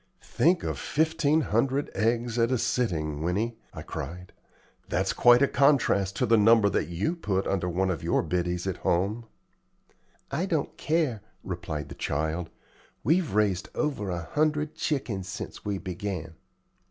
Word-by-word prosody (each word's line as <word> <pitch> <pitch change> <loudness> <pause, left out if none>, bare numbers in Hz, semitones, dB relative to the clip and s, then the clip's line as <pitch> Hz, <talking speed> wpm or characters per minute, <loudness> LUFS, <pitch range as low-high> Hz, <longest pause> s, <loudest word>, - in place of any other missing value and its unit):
"Think 175 +2 +2
of - - -3
fifteen 160 0 +2
hundred 135 +3 0
eggs 115 +2 0
at 115 0 +3
a 130 - +2
sitting, 80 -12 -1
Winnie!" 105 +7 -1
I - - -8
cried; 90 +2 -7 0.6
"that's - - 0
quite 120 +2 +6
a - - +5
contrast 120 -9 +3
to - - +1
the 115 +1 +4
number 110 -1 +6
that - - 0
you 90 - -1
put 100 - -1
under 90 -2 0
one 95 +2 +1
of 80 - -3
your - - +1
biddies 90 0 -1
at 95 - -2
home." 100 +7 0 1.1
"I 160 +7 -1
don't 160 -6 -1
care," 155 -9 0 0.2
replied 75 -2 -5
the - - -7
child; 80 +3 -2 0.5
"we've 165 - +2
raised 100 -3 +1
over 135 -10 -1
a 85 -2 -3
hundred 150 0 +1
chickens 115 - -2
since 100 +1 -7
we 100 -2 -2
began." 90 -3 -5
105 Hz, 155 wpm, -27 LUFS, 90-140 Hz, 1.1 s, quite